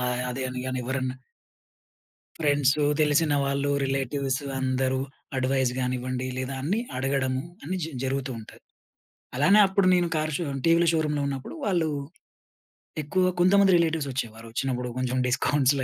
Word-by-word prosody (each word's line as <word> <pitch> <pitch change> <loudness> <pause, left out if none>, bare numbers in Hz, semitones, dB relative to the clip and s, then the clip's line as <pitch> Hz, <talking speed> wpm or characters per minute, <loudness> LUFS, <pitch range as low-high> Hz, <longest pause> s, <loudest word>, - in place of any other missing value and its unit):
ఆహ్, 125 0 -1
అదే 130 +2 -4
అనగాని 130 0 -3
ఎవరన్నా 130 0 -2 1.2
ఫ్రెండ్స్, 145 -2 +3 0.2
తెలిసిన 150 0 +3
వాళ్ళు, 140 +1 0
రిలేటివ్స్, 135 0 -1 0.2
అందరూ 130 0 0 0.4
అడ్వైస్ 130 -1 +1
కానివ్వండి 125 0 -2
లేదా 130 +1 -3
అన్ని 190 +11 0 0.2
అడగడము 130 -1 0 0.2
అన్ని 185 +5 -3
జ-జరుగుతూ 135 -2 -3
ఉంటాయి. 110 - -13 0.7
అలానే 195 +10 +5
అప్పుడు 190 -1 +2
నేను 175 -1 +3
కార్ 155 0 -1
షో 175 - -3 0.2
టీవీల 170 +1 +5
షోరూమ్‌లో 150 -2 0
ఉన్నప్పుడు 135 - -5
వాళ్ళు 175 -6 +1 1.1
ఎక్కువ 185 +6 +1 0.2
కొంతమంది 195 0 +5
రిలేటివ్స్ 160 -4 0
వచ్చేవారు. 115 -3 -5
వచ్చినప్పుడు 125 +1 -2
కొంచెం 130 0 -1
డిస్కౌంట్స్‌లో 135 +2 +2
135 Hz, 125 wpm, -26 LUFS, 130-155 Hz, 1.2 s, అలానే